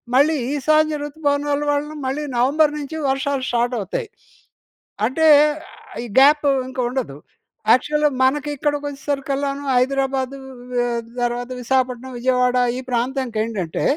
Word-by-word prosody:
మళ్ళీ 300 +4 +4 0.2
ఈశాన్య 310 +2 +2
ఋతుపవనాలు 290 -1 -1
వలన, 295 +1 -2
మళ్ళీ 290 +3 -2
నవంబర్ 295 +5 +3
నించి 295 +3 -6
వర్షాలు 270 0 -1
స్టార్టవుతాయి. 245 - -1 1.0
అంటే, 320 +7 +2 0.4
ఆహ్, - - -14
ఈ - - -6
గ్యాప్ 290 +2 +5 0.2
ఇంక 260 0 -8
ఉండదు. 245 - -4 0.5
యాక్చువల్‌గా 300 +4 +3
మనకి 290 +3 +2
ఇక్కడికొచ్చేసరికల్లాను 280 -1 -2
హైదరాబాదు, 270 +1 0 0.4
వె 245 0 +1 0.4
తర్వాత 245 +1 -2
విశాఖపట్నం, 255 0 -1
విజయవాడ 250 0 +2 0.2
ఈ - - -3
ప్రాంతానికేంటంటే, 230 - -2
270 Hz, 105 wpm, -21 LUFS, 250-290 Hz, 1.0 s, గ్యాప్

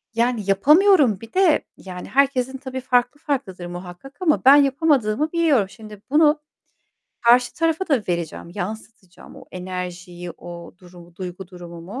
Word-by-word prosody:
...yani 235 -1 +1
yapamıyorum 280 - +4
bir 230 - -12
de 370 -4 +3
yani, 180 -1 -9
herkesin 265 -1 +1
tabii 260 -1 -6
farklı 250 +1 +1
farklıdır 250 - -4
muhakkak 180 +10 -10
ama 310 -6 +1
ben 270 +2 +9
yapamadığımı 285 -2 +2
biliyorum. 300 - +2
Şimdi 210 0 -13
bunu 300 +1 +3 0.8
karşı 245 +1 +4
tarafa 330 +3 -1
da 265 -7 +2
vereceğim, 170 -1 -4
yansıtacağım 210 -4 -8
o - - -13
enerjiyi, 180 -1 -7
o 170 0 -11
durumu, 175 -2 -16
duygu 180 0 -7
durumumu. 175 +4 -9
225 Hz, 135 wpm, -22 LUFS, 180-280 Hz, 0.8 s, ben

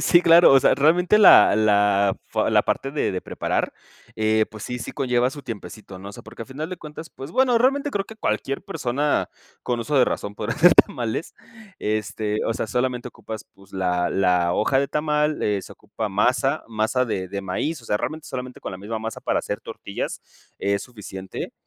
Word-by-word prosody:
Sí, 175 0 +4
claro, 170 +1 +7
o 135 - +8
sea, - - +4
realmente 175 +8 +4
la 210 - +8
la, 100 -2 +3
fa - - 0
la - - +4
parte 135 - -2
de 145 -8 -1
de 90 - -3
preparar, - - -2 0.4
eh, 110 0 +2
pues 110 -1 -10
sí, 125 0 -4
sí - - -6
conlleva 125 -2 +1
su 145 +1 -9
tiempecito, 100 -3 -8
¿no? 100 +2 -9
O - - -9
sea, - - -11
porque 110 +1 -13
al - - -11
final 155 +6 -6
de 180 - -6
cuentas, 155 +1 -10
pues 135 +4 -9
bueno, 250 +2 +3
realmente 275 +4 +2
creo 200 -4 -2
que 220 - -11
cualquier 135 - -2
persona 140 +4 -1 0.3
con 120 -1 -1
uso 145 +3 0
de 125 - +5
razón 105 0 -3
podría 105 +2 -3
hacer 175 +1 +7
tamales, 120 +6 +1 0.4
este, 105 0 -2
o 115 - 0
sea, - - -3
solamente 125 +2 -1
ocupas, 110 -2 -9
pues 100 0 -21
la 90 -2 0
la 90 -2 +2
hoja 135 +5 +2
de 140 - -1
tamal, 150 0 0
eh, 105 -1 +1
se - - -11
ocupa 105 +1 -6
masa, 125 +7 +1
masa 115 +3 0
de 95 -5 -3
de 100 +1 -5
maíz, 125 - -3
o - - -16
sea, 105 - 0
realmente 155 0 -5
solamente 130 -1 -6
con - - -6
la 95 - -7
misma 110 +3 -5
masa 110 0 -6
para - - 0
hacer 105 +2 -4
tortillas 110 -3 -6 0.4
es 100 0 0
suficiente, 95 -5 -8
115 Hz, 205 wpm, -23 LUFS, 105-145 Hz, 0.4 s, o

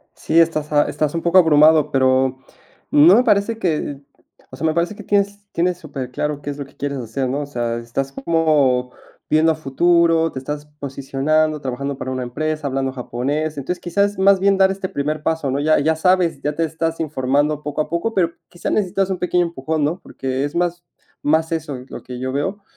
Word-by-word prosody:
Sí, 165 - 0
estás 155 -2 +1
a 145 - +5
estás 150 0 -2
un 165 - -2
poco 170 +2 +4
abrumado, 155 -2 +5
pero, 130 0 +2 0.5
no 155 +5 +7
me 250 - +4
parece 215 0 +2
que 155 -7 -2 0.5
o 130 - -10
sea, 140 - -1
me 160 - +2
parece 175 +5 -1
que - - -9
tienes 200 0 +1 0.4
superclaro 145 0 -4
qué 145 - -8
es 140 - -6
lo 140 - -4
que 135 - -19
quieres 140 -1 -4
hacer, 125 +3 -3
¿no? 135 +3 -2
O 145 - -4
sea, 120 -4 -2
estás 120 +4 -4
como 140 -6 +1 0.4
viendo 160 +1 +4
a - - -5
futuro, 165 +2 +2
te - - -5
estás 145 +3 -5 0.2
posicionando, 140 +3 0
trabajando 135 +1 -4
para 130 - -4
una 130 -1 -3
empresa, 155 +4 -3
hablando 135 -1 -1
japonés. 140 +5 -3
Entonces, 160 +6 -3
quizás, 200 +3 0
más 195 0 +5
bien, 195 0 +3
dar 190 0 +4
este 190 -1 -3
primer 150 +1 -3
paso, 160 -4 -1
¿no? 140 +2 -1
Ya 155 +1 +3
ya 160 +2 +1
sabes, 180 0 +2
ya 150 0 -1
te 165 - 0
estás 165 +1 -2
informando 145 0 0
poco 150 +1 -1
a - - -12
poco, 170 +7 -1
pero 175 -4 +2 0.2
quizás 175 - -4
necesitas 195 -1 0
un 185 - -1
pequeño 180 0 +1
empujón, 160 -2 -2
¿no? 165 +5 -1
Porque 130 +1 -4
es 145 +2 -4
más 175 0 -1 0.4
más 160 +2 +2
eso 155 -4 -3
lo - - -8
que 125 -1 -7
yo 130 0 -2
veo, 190 +9 -2
155 Hz, 205 wpm, -20 LUFS, 135-170 Hz, 0.5 s, no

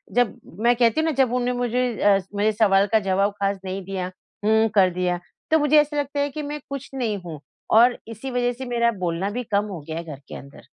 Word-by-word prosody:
जब 245 -3 +1 0.2
मैं 240 +1 +5
कहती 235 +3 +3
हूँ - - 0
ना - - +1
जब 245 -2 -2
उन्होंने 250 0 0
मुझे 245 -1 -1
अ, 200 -1 +5 0.2
मुझे 210 +2 +2
सवाल 200 -2 +3
का 220 - +5
जवाब 195 0 +1
ख़ास 200 0 0
नहीं 190 +1 -4
दिया। 185 -1 -4 0.3
हुँ, 220 +1 +4
कर 190 -2 +6
दिया। 180 0 -1 0.3
तो 320 - +5
मुझे 295 +1 +4
ऐसा 295 0 -4
लगता 285 0 -2
है 285 0 +1
कि 305 +2 -6
मैं 295 +1 -5
कुछ 275 -1 -6
नहीं 235 -6 -1
हूँ 160 -3 -7 0.4
और 240 +2 +6
इसी 230 +4 -7
वजह 245 0 +1
से 260 +2 -7
मेरा 235 -1 +1
बोलना 175 +2 -1
भी 245 +4 -3
कम 205 -2 0
हो 195 -5 -6
गया 160 0 -4
है 170 - -4
घर 150 -4 -8
के - - -8
अंदर। 140 +1 -12
220 Hz, 240 wpm, -23 LUFS, 195-250 Hz, 0.4 s, कर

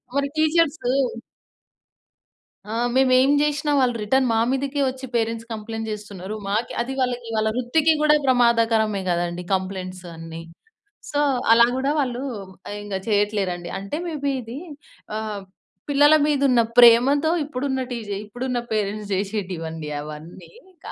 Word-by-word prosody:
మరి 280 0 +1
టీచర్సు 315 -4 +2 1.8
ఆ! - - -2 0.2
మేమేం 260 +1 +4
జేషినా 295 0 0
వాళ్ళు 250 -2 +2
రిటర్న్ 260 +4 +2
మా - - +2
మీదకే 275 +2 -2
ఒచ్చి 260 +1 -7
పేరెంట్స్ 230 0 -1
కంప్లెయింట్ 225 0 -5
చేస్తున్నారు. 205 -1 -6
మాకే 215 +4 -1
అది 260 +3 -3
వాళ్ళకి, 245 -2 -1
వాళ్ళ 220 0 +1
వృత్తికి 290 +6 +2
కూడా 300 0 +5
ప్రమాదకరమే 230 -4 +3
గదండీ 175 0 -1
కంప్లెయింట్స్ 185 -1 -5
అన్ని. 165 0 -8 0.7
సో, 290 - 0 0.3
అలా 235 0 +7
గూడా 270 +2 0
వాళ్ళూ 250 -2 -1 0.5
ఆహ్, 205 - -5
ఇంగ 205 -2 -5
చెయ్యట్లేరండి. 200 -5 0
అంటే, 200 +9 -5
మేబీ 285 -4 -2
ఇదీ 235 +5 -8 0.6
ఆహ్, 215 -2 -4 0.5
పిల్లల 290 +2 +5
మీదున్న 275 -4 +3 0.2
ప్రేమతో 260 +6 +6
ఇప్పుడున్న 265 -1 -2
టీజే 215 -4 -4
ఇప్పుడున్న 245 +3 -3
పేరెంట్స్ 210 0 -2
చేసేటివండి 180 -6 -4
అవన్నీ. 155 +4 -10 0.3
క - - -14
230 Hz, 125 wpm, -23 LUFS, 200-265 Hz, 1.8 s, అలా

